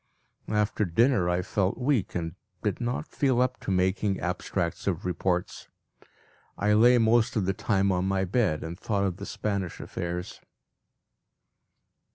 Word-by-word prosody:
After 105 0 +1
dinner 105 +1 +3
I 90 +1 0
felt 95 +1 0
weak, 125 -6 0
and 85 -1 -2 0.3
did 105 +3 -1
not 120 +5 -2
feel 130 -6 +1
up 125 +1 +1
to - - -6
making 95 +1 +1
abstracts 90 -1 -2
of 90 -2 -1
reports. 90 0 -2 0.9
I 105 0 +2
lay 120 +4 +6
most 115 0 +3
of 105 -4 +1
the 95 - +1
time 100 0 +1
on 90 0 0
my 95 0 +1
bed, 95 -5 +1
and 85 +3 -6
thought 100 -2 0
of 95 -2 -1
the 100 - -7
Spanish 100 -4 -3
affairs. 85 +1 -5
100 Hz, 150 wpm, -27 LUFS, 90-110 Hz, 0.9 s, lay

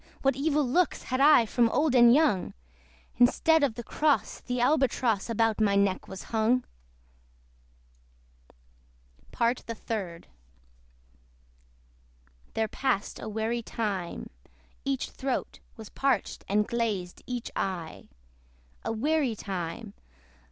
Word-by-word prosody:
what 270 -1 +3
evil 290 0 +1
looks 350 +7 +1
Had 255 +1 -1
I 285 -5 +7
from 235 +1 +2
old 290 +3 +1
and 240 -2 +7
young! 275 - +2 0.6
Instead 310 +6 +4
of 260 -6 +1
the 240 - -6
cross, 295 +5 0
the 250 0 -3
Albatross 245 -5 +1
About 225 -1 +1
my 200 -2 +3
neck 200 -1 +1
was 190 - -8
hung. 230 +3 +2 2.7
PART 235 +1 0
THE 230 - -4
THIRD. 190 -7 -5 2.3
There 220 0 +1
passed 250 -3 -2
a 220 - -6
weary 220 +2 -2
time. 205 -6 -4 0.5
Each 275 -1 -2
throat 265 -1 -3 0.2
Was 220 -2 -10
parched, 270 -6 -1
and 210 +1 +1
glazed 210 -7 -2
each 245 -2 -4
eye. 175 -4 -4 0.8
A - - -2
weary 270 +1 0
time! 195 +2 -5
235 Hz, 115 wpm, -28 LUFS, 210-265 Hz, 2.7 s, I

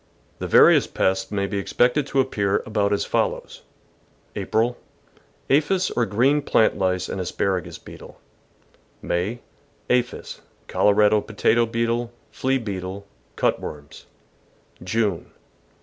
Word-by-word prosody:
The - - -4
various - - +6
pests 95 0 0
may 100 -1 -1
be 100 +1 -3
expected 125 +7 +1
to 135 - 0
appear 105 -6 0
about 105 -2 0
as 100 - 0
follows: - - -2 0.7
April. 120 +2 0 0.4
— - - -34
Aphis 180 +7 +2
or 120 -2 0
green 130 +9 +2
plant 115 -5 +2
lice 95 -1 -1
and 95 - -4
aspara 90 0 -1
gus - - -9
beetle. - - -13 0.8
May. 100 +8 -2 0.2
— - - -37
Aphis, 125 0 -1 0.3
Colorado 105 +1 +3
potato 110 +2 +1
beetle, 115 +1 -1 0.2
flea 135 +1 0
beetle, 100 -3 -6 0.3
cut - - +1
worms. 75 -1 -9 0.8
June. 100 -1 -1
105 Hz, 125 wpm, -23 LUFS, 95-120 Hz, 0.8 s, various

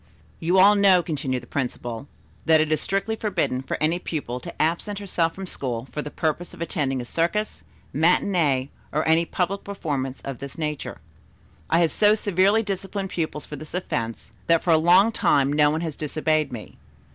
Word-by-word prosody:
"You 175 +3 +1
all 200 +2 +8
know," 195 -3 +5
continued 135 -7 -3
the - - -11
principal, 120 -1 -4 0.4
"that 160 -1 +6
it 155 0 +1
is 155 - +1
strictly 200 +3 -1
forbidden 185 -12 -1
for 130 - -4
any 160 +3 +1
pupil 140 -8 -4
to - - -10
absent 170 +6 0
herself 175 -5 -1
from 195 - -6
school 130 -7 -4
for 150 - -3
the 150 - -6
purpose 160 +3 -2
of - - -16
attending 140 -6 -1
a - - -7
circus, 175 - -1 0.3
matinée 155 -4 +2 0.2
or 155 - 0
any 165 +1 +4
public 190 +3 -2
performance 145 -9 -3
of 135 -3 -5
this 140 +3 -8
nature. 150 -2 -4 0.7
I 165 - +4
have 165 -3 +2
so 210 +5 +4
severely 205 +1 +2
disciplined 195 -1 -4
pupils 155 -3 -3
for 150 - -8
this 155 +4 -8
offence 115 -11 -4
that 165 -1 +3
for 175 - +2
a 160 - +6
long 180 +7 +5
time 140 -9 +2
no 150 0 +4
one 155 +2 -1
has 160 -4 -4
disobeyed 155 -1 0
me. 115 -4 -9
160 Hz, 185 wpm, -24 LUFS, 145-185 Hz, 0.7 s, all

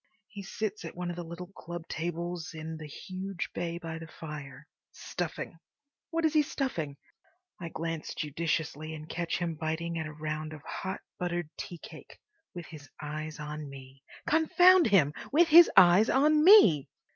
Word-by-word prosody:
He 205 -2 -8
sits 210 +1 -4
at 165 - -7
one 175 0 -3
of - - -6
the 175 - -5
little 170 +2 -8
club 170 0 -8
tables 170 0 -4
in 160 0 -6
the 155 -1 -8
huge 185 +4 -6
bay 170 -1 -3
by 165 -2 -6
the 165 - -9
fire, 150 -3 -9 0.2
stuffing. 165 -1 -5 0.5
What 330 0 0
is 315 - +2
he 305 - +5
stuffing? 170 - -3 0.6
I 170 -2 -5
glance 165 -1 -4
judiciously 155 0 -2
and 155 0 -9
catch 170 +1 -2
him 170 -1 -2
biting 160 +2 -3
at 160 - -3
a - - -7
round 155 0 -4
of 155 -1 -11
hot 190 +4 -5 0.2
buttered 175 -3 -2
tea 175 - -7
cake, - - -12 0.4
with 175 -2 -6
his 150 -3 -12
eyes 155 +1 -5
on 150 -1 -6
me. 135 0 -12 0.3
Confound 355 +3 +6
him!—with 205 - +3
his 335 +2 +9
eyes 185 +3 +7
on 300 +3 +4
me! 310 - +7
170 Hz, 165 wpm, -30 LUFS, 155-190 Hz, 0.6 s, his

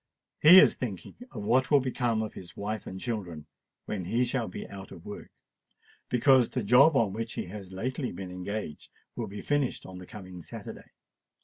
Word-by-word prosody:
He 170 +5 +9
is - - +5
thinking 105 -8 -5 0.2
of 105 - -7
what 125 +5 +2
will 145 - +6
become 120 -4 0
of 110 - -6
his 90 -2 -11
wife 105 +1 -4
and 95 - -6
children 95 -10 -4 0.4
when 95 -4 -4
he 120 +7 +1
shall 120 -2 -1
be 90 - -7
out 95 -1 -10
of 85 - -12
work—because 125 +4 -1
the 125 - -2
job 130 +9 +6
on 110 -6 +2
which 115 +1 -4
he - - -4
has 95 0 -9
lately 125 +7 -3
been 95 -2 -7
engaged 90 -3 -5 0.3
will - - -3
be 100 +1 -8
finished 145 -3 0
on 95 -1 -9
the 90 - -11
coming 95 -4 -10
Saturday. - - -9
110 Hz, 185 wpm, -29 LUFS, 95-125 Hz, 0.4 s, He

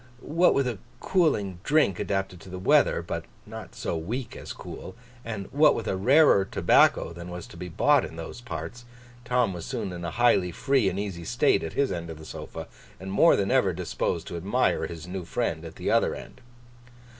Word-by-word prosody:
What 175 +2 +5
with 140 - +2
a 115 -6 -3 0.2
cooling 105 - +1
drink 145 - +2
adapted 95 -2 -2
to 95 - -12
the 90 - -6
weather, 95 - +3
but - - -4 0.2
not - - -9
so - - -3
weak 115 +10 -4
as - - -8
cool; 95 - -9 0.3
and 110 -4 -5
what 150 +3 +5
with 115 - -4
a - - 0
rarer 130 +1 +5
tobacco 95 - +3
than 85 +1 -9
was 90 -1 -7
to - - -14
be 90 +1 -7
bought 145 - +3
in 80 - -7
those 85 +8 -8
parts; 120 +3 -7 0.4
Tom 125 -4 +1
was 85 -2 -6
soon 110 -6 -4
in 85 0 -7
a 85 - -2
highly 95 -4 +3
free 130 +3 +2
and 95 +1 -4
easy 95 -5 -4
state - - +2
at 80 - -5
his 140 -1 +1
end 85 -1 -4
of 80 - -7
the 80 - -11
sofa, - - -8 0.3
and 95 0 -6
more 165 +12 +5
than 100 +2 0
ever 125 -8 +3
disposed 85 -1 -2
to 85 - -6
admire 95 +4 +1
his 85 0 -8
new 90 0 -5
friend 85 - -2
at - - -9
the - - -2
other - - +2
end. - - -11
95 Hz, 205 wpm, -26 LUFS, 85-120 Hz, 0.4 s, What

